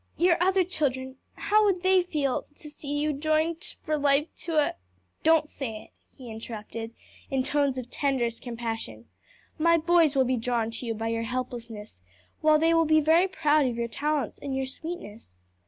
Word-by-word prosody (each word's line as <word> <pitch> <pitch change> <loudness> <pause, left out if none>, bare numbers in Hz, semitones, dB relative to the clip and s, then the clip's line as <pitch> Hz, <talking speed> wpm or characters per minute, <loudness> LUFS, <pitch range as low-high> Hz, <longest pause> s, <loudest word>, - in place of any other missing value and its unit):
your 345 0 +4
other 380 +1 +4
children? 265 -7 -2 0.2
how 430 +1 +3
would 375 -4 +1
they 375 0 +5
feel 295 -7 -1
to 300 - -11
see 290 -1 -8
you 300 +1 0
joined 310 +3 0 0.2
for 305 -2 -1
life 285 +1 +3
to 330 -1 -4
a 300 - +3 0.3
" 90 -1 -43
"Don't 320 -1 +4
say 225 -8 -6
it," - - -20 0.3
he 250 -4 -10
interrupted, 225 +1 -7 0.3
in 265 -1 0
tones 280 -1 +1
of 250 -2 -5
tenderest 250 -5 -1
compassion. 225 - -5 0.5
"My 335 +1 +5
boys 330 -2 +3
will 265 -1 +4
be 255 0 +1
drawn 230 -1 -1
to 235 +1 -5
you 225 - -1
by 225 +1 -3
your 230 0 -1
helplessness, 235 - -5 0.4
while 310 0 +5
they 325 +2 +3
will 330 0 +4
be 310 0 +5
very 325 +5 +4
proud 305 -5 +2
of 245 - -2
your 235 0 -1
talents 295 +4 -2
and 275 -2 -4
your 265 - -1
sweetness. 230 - -9
280 Hz, 185 wpm, -27 LUFS, 235-315 Hz, 0.5 s, they